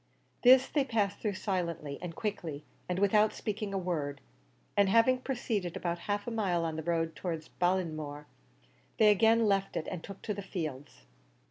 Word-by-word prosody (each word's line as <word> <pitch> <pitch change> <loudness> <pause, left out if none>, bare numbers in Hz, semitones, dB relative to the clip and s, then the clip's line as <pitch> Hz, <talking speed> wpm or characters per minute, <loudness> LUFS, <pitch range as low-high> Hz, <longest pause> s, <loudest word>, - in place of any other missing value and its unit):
This 260 +1 +7
they 290 - +1
passed 220 -6 0
through 210 -3 -2
silently 170 -7 -3
and 175 -2 -6
quickly 170 -9 -4 0.2
and 180 - 0
without 210 +2 +4
speaking 210 -1 -3
a 195 - -1
word, 155 -6 -2 0.6
and 200 -1 +4
having 230 +4 +4
proceeded 230 -9 -2
about 170 -1 -2
half 205 0 0
a 240 - -4
mile 185 -7 0
on 160 -1 -2
the 160 - -3
road 165 -1 -1
towards 160 0 -4
Ballinamore, 155 -5 -1 0.7
they 215 -1 +7
again 225 +2 +4
left 195 -1 +1
it 155 - -2
and 180 -3 -5
took 200 - -10
to 210 - -2
the 200 - -5
fields. 155 - -6
190 Hz, 170 wpm, -31 LUFS, 165-210 Hz, 0.7 s, This